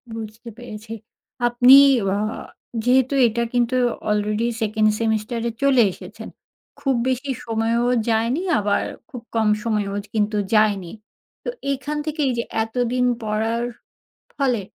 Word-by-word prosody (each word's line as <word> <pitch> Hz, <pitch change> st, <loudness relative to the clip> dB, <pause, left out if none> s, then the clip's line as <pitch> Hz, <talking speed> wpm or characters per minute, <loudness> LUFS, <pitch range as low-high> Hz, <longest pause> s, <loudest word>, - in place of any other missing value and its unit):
বুঝতে 225 Hz, +1 st, -8 dB
পেরেছি। 225 Hz, -2 st, -9 dB, 0.5 s
আপনি 245 Hz, +2 st, +7 dB, 0.4 s
আ -, -, -1 dB, 0.7 s
যেহেতু 260 Hz, +2 st, +3 dB
এটা 235 Hz, +1 st, -1 dB
কিন্তু 245 Hz, +1 st, +1 dB, 0.3 s
আলরেডি 210 Hz, +2 st, 0 dB
সেকেন্ড 215 Hz, 0 st, +2 dB
সেমিস্টার 225 Hz, +1 st, -1 dB
এ -, -, -5 dB
চলে 265 Hz, -3 st, +5 dB
এসেছেন। 215 Hz, +4 st, -10 dB, 0.5 s
খুব 270 Hz, -2 st, 0 dB
বেশি 265 Hz, +2 st, -2 dB
সময়ও 230 Hz, +1 st, 0 dB, 0.2 s
যায়নি, 230 Hz, +8 st, +1 dB, 0.2 s
আবার 205 Hz, 0 st, +1 dB, 0.3 s
খুব 245 Hz, -, -8 dB
কম 220 Hz, -1 st, +2 dB
সময়ও 210 Hz, -3 st, -1 dB, 0.2 s
কিন্তু 210 Hz, 0 st, 0 dB, 0.2 s
যায়নি। 205 Hz, -5 st, +2 dB, 0.5 s
তো -, -, -3 dB, 0.2 s
এখান 290 Hz, +3 st, -4 dB
থেকেই 300 Hz, -3 st, -1 dB
যে 235 Hz, -, 0 dB, 0.2 s
এতদিন 245 Hz, +2 st, -1 dB, 0.2 s
পড়ার 220 Hz, +2 st, -1 dB, 0.7 s
ফলে 250 Hz, -6 st, +1 dB
230 Hz, 120 wpm, -22 LUFS, 215-250 Hz, 0.7 s, আপনি